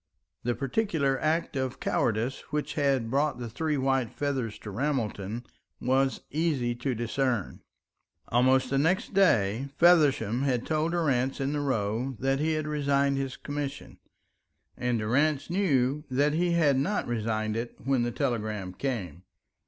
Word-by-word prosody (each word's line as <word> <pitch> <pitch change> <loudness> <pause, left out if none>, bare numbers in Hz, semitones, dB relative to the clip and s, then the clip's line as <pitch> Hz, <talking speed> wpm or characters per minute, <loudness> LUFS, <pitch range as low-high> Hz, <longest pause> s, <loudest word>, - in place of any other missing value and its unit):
The 120 0 -1
particular 140 - 0
act 160 0 0
of 130 -2 -2
cowardice 115 +3 0
which 150 +1 -2
had 135 -6 +1
brought 145 +2 +1
the 120 -1 -5
three 155 +3 -1
white 135 -3 +1
feathers 135 -7 -2
to 105 - -7
Ramelton 115 -3 -2 0.3
was 130 +1 +1
easy 145 -6 0
to 125 +2 -2
discern. 120 -1 -1 0.7
Almost 130 +2 +3
the 135 - +2
next 180 +8 +1
day 130 - +3
Feversham 150 - +4
had 130 -4 0
told 160 +2 0
Durrance 135 -6 +1
in 135 +1 -1
the 150 - -1
Row 125 0 -1
that 135 +4 0
he 160 +2 +1
had 155 0 -1
resigned 140 -2 +1
his 135 -1 -3
commission, 145 -1 -5 0.8
and 125 -1 0
Durrance 145 +8 +1
knew 150 -7 +1
that 145 +3 +2
he 175 +2 +1
had 150 -5 +3
not 205 +10 0
resigned 110 -2 -1
it 115 +1 -4
when 135 -2 +2
the 120 - 0
telegram 105 -6 -2
came. 95 - -4
135 Hz, 145 wpm, -28 LUFS, 120-150 Hz, 0.8 s, Feversham